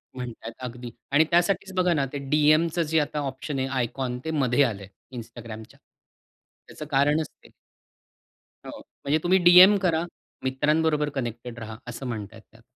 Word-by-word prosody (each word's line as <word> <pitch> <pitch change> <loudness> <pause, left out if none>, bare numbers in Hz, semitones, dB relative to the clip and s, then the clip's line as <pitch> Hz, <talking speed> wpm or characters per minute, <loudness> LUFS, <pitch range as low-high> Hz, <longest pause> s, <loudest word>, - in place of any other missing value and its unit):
म्हणतात, 120 -3 -7
अगदी. 125 -1 -7 0.2
आणि 145 +3 +5
त्यासाठीच 190 +2 +1
बघा 180 -1 +2
ना, 140 -4 +1
ते - - -2
डी-एमचं 155 +3 +3
जे 160 0 +1
आता 150 0 -2
ऑप्शन 135 0 -4
आहे 130 - -1
आयकॉन 125 -1 -3
ते 160 - -2
मध्ये 140 -2 +2
आलंय 100 -6 -3 0.3
Instagramच्या. 115 -2 -10 0.9
त्याचं 150 - -9
कारणच 145 +3 +2 0.2
ते. - - -17 1.2
हो - - -8
म्हणजे 145 +2 -2
तुम्ही 185 +2 +4
डी-एम 185 +3 +9
करा 165 -1 +1 0.4
मित्रांबरोबर 150 +3 +1
कनेक्टेड 120 -1 -5
रहा 110 -1 -8
असं 125 +2 -6
म्हणत 110 -4 -4
आहे 115 - -12
ते - - -39
त्यात. 115 0 -20
140 Hz, 155 wpm, -25 LUFS, 120-155 Hz, 1.2 s, डी-एम